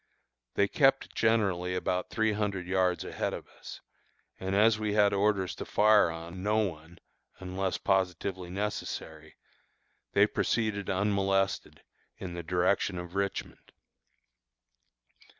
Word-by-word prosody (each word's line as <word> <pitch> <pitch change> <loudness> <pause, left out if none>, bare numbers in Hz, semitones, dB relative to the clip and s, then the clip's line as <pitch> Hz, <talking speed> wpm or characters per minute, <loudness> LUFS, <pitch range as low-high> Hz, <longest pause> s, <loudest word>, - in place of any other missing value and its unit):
They 100 - +3
kept 135 +3 +2
generally 95 -5 +1
about 90 0 -1
three 110 -1 +1
hundred 100 -3 -2
yards 90 -1 +1
ahead - - -2
of - - -9
us, - - -11 0.6
and 95 +1 -2
as 110 +1 +4
we 105 -1 -1
had 105 -1 +4
orders 100 -2 +1
to - - -4
fire 105 -3 +4
on 85 +2 -7
no 105 +2 +1
one 85 -5 -3 0.4
unless 95 0 -2
positively 95 -1 -1
necessary, 90 -5 -5 0.8
they - - +6
proceeded 110 -3 -1
unmolested, 95 0 0 0.3
in 90 -2 -6
the 85 - -4
direction 90 +3 +1
of 90 0 -7
Richmond. 100 0 -4
95 Hz, 120 wpm, -29 LUFS, 90-105 Hz, 0.8 s, they